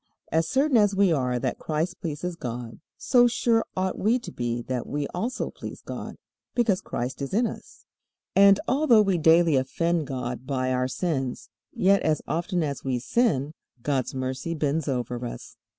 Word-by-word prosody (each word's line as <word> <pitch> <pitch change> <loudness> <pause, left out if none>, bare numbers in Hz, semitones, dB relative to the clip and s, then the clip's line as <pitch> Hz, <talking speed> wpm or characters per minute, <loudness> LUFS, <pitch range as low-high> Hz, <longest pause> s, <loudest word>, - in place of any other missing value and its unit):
As 160 +1 +1
certain 275 -1 +3
as 205 -2 +4
we 195 -3 +4
are 125 -4 0
that 120 - -2
Christ 165 +4 -2
pleases 170 +1 -4
God, 120 -5 -6 0.2
so 245 -1 +4
sure 230 -1 +2
ought 185 0 -1
we 225 +5 +3
to 245 - -8
be 120 -1 -3
that 125 -1 -3
we 145 0 -2
also 230 +8 -3
please - - -9
God, - - -6 0.4
because 215 -6 +2
Christ 125 -2 -4
is 140 +7 -3
in 235 +3 +3
us. - - -8 0.5
And 200 0 +7
although 255 -5 +5
we 190 -4 +1
daily 160 0 +5
offend 165 +4 0
God 125 -1 -4
by 130 -2 0
our 125 0 +1
sins, 135 -4 -3 0.2
yet 195 +2 +3
as 155 -1 0
often 175 +1 -1
as 140 -2 -3
we 130 -2 0
sin, 145 - +1 0.3
God's 135 -2 -1
mercy 130 +5 -3
bends 150 0 -1
over 125 -2 -2
us. 120 - -7
160 Hz, 170 wpm, -26 LUFS, 130-195 Hz, 0.5 s, And